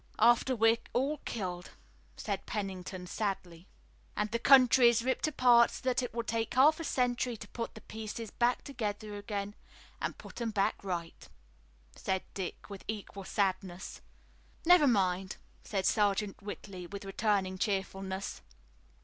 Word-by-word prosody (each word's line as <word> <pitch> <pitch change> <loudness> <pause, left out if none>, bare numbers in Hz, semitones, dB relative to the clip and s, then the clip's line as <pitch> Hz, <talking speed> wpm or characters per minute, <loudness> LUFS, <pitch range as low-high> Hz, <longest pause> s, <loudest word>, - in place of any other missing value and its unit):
"After 240 +2 +4
we're 225 0 +4
all 275 +4 0
killed," 180 -5 -4 0.5
said 200 -2 -4
Pennington 190 -3 -4
sadly. 180 -3 -4 0.5
"And 210 0 -1
the 235 - 0
country 255 -2 +7
is 235 -1 +1
ripped 260 +4 +1
apart 245 -5 +5
so - - -8
that 255 0 +1
it 245 - -4
will 235 +1 -2
take 225 0 -2
half 300 +5 +6
a - - -3
century 245 -4 0
to 210 - -10
put 230 -1 -5
the 220 - -10
pieces 220 0 -6
back 240 +1 +1
together 215 -5 -4
again 205 0 -4 0.5
and - - -2
put - - -10
'em 235 - 0
back 200 -2 0
right," 175 -3 -5 0.7
said 190 -1 -1
Dick, 190 -3 -5
with 200 -2 -9
equal 200 -2 -6
sadness. 185 -2 -2 0.6
"Never 345 -3 +7
mind," 190 -4 +1 0.3
said 195 -3 -2
Sergeant 205 -1 +1
Whitley 195 -3 -7
with 200 +2 -7
returning 195 -2 0
cheerfulness. 195 -1 -2
210 Hz, 145 wpm, -32 LUFS, 195-240 Hz, 0.7 s, country